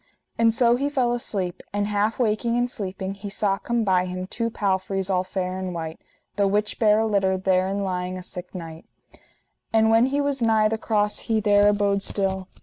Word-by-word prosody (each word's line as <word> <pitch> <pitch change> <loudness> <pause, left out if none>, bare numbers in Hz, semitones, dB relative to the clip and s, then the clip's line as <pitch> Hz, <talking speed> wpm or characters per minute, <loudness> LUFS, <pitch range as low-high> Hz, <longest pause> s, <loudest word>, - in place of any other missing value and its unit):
And 230 -1 +4
so 235 +1 +3
he 280 +2 -1
fell 255 -4 +1
asleep; 190 -6 -2
and 205 0 -1
half 210 +1 0
waking 235 0 0
and 245 0 +1
sleeping 195 -4 -4
he 200 +1 -8
saw 195 -1 +1
come 235 -1 -1
by 185 -3 +2
him 185 0 -4
two 230 +4 -3
palfreys 195 -2 -1
all 185 -1 +1
fair 185 0 -3
and 185 -2 -4
white, 160 -1 -6 0.4
the 200 -1 +3
which 210 +2 -1
bare 210 -2 +4
a 220 - +2
litter, 195 -3 +1
therein 190 +1 +1
lying 185 -2 -2
a 185 - -7
sick 180 +1 -5
knight. 165 -2 -8 0.9
And 220 0 +4
when 225 +3 +5
he 280 +2 -1
was 285 -2 0
nigh 220 -2 +3
the 220 0 -2
cross 210 -2 0
he 220 -1 +3
there 205 -1 +4
abode 200 -1 +2
still. 190 -1 -2
205 Hz, 200 wpm, -24 LUFS, 190-225 Hz, 0.9 s, when